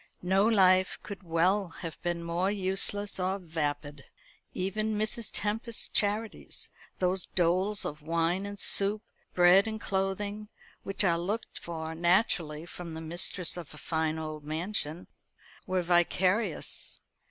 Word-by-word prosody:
No 190 +3 +3
life 185 -4 +4
could 200 -2 -8
well 180 +3 +1
have 165 -1 -9
been 175 -1 -2
more 170 +3 0
useless 200 +1 -1
or 185 +1 0
vapid. 150 -5 -4 0.5
Even 215 +3 -2
Mrs. 215 +1 0
Tempest's 225 +2 -1
charities 210 +2 0 0.3
those 185 0 0
doles 185 +4 +1
of 150 +1 -5
wine 165 +5 0
and 205 0 -8
soup, 205 +3 +5 0.3
bread 180 +4 +6
and 220 0 -4
clothing, 200 +2 -2 0.3
which 195 +1 +1
are 170 -3 +2
looked 205 +7 -4
for 160 -1 -5
naturally 170 -3 +1
from 175 -2 -8
the - - -5
mistress 170 +2 0
of 165 -3 -8
a - - -12
fine 160 0 -1
old 155 -1 -6
mansion 160 +1 -3 0.6
were 185 -1 0
vicarious. 180 +3 0
185 Hz, 130 wpm, -29 LUFS, 165-200 Hz, 0.6 s, bread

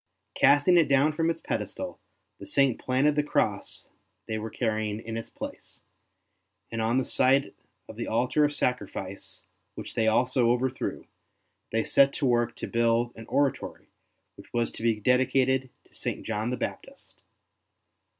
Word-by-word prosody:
Casting 145 +5 +5
it 165 -3 +5
down 140 +3 +4
from 165 +1 +1
its 165 - -2
pedestal, - - -4 0.4
the - - -9
Saint 135 -3 +2
planted 135 +3 +2
the 150 - +3
Cross 145 - -1 0.4
they 110 0 -3
were 110 +1 -5
carrying 110 -2 -2
in 115 0 -6
its 115 - -5
place; - - -9 0.9
and 115 0 -2
on 115 +3 +1
the 130 - +1
site 135 +2 +3 0.3
of - - -11
the - - -4
altar 125 +6 +2
of 145 - +3
sacrifice, 105 -8 -3 0.3
which - - -7
they 115 -2 +1
also 125 +2 +3
overthrew, 125 +2 -1 0.7
they 115 0 +1
set 140 0 +4
to 145 - -2
work 120 -2 +2
to - - -5
build 115 +1 +1
an 115 0 -10
oratory 140 -2 -1 0.5
which - - -14
was 120 -1 0
to - - -10
be 115 -2 +1
dedicated 130 +2 +2 0.2
to - - -28
St. - - -4
John 110 +1 -2
the 125 - -2
Baptist. - - -7
125 Hz, 160 wpm, -27 LUFS, 115-135 Hz, 0.9 s, Casting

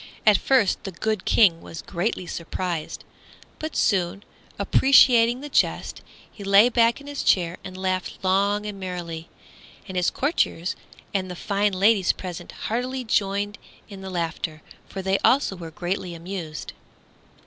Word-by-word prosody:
At 210 -3 +6
first 255 -8 +2
the 195 - -5
good 215 +2 -2
King 175 -7 +4
was 165 - -9
greatly 185 +1 -2
surprised; 170 -1 -4 0.6
but 315 0 -5
soon, 195 -1 +1 0.3
appreciating 240 +2 +5
the 295 - -6
jest, 290 - 0 0.3
he 205 - -11
lay 200 +4 +6
back 235 0 +3
in 280 - -13
his 285 -1 -4
chair 175 -2 +2
and 185 0 -8
laughed 185 -1 -2
long 200 +2 +2
and 205 -2 -6
merrily. 175 -3 -6 0.6
And 190 - -7
his 180 -1 +2
courtiers 260 - -1 0.4
and 190 -2 -1
the 180 - -6
fine 200 +2 0
ladies 195 0 +3
present 180 -3 -7
heartily 250 +3 -3
joined 205 -2 0 0.3
in 195 -2 -9
the 190 - -7
laughter, 165 -3 -3 0.3
for 190 - -6
they 190 +1 +1
also 260 -7 +3
were 170 -2 -8
greatly 175 +2 -4
amused. 165 -3 -6
195 Hz, 150 wpm, -24 LUFS, 180-215 Hz, 0.6 s, At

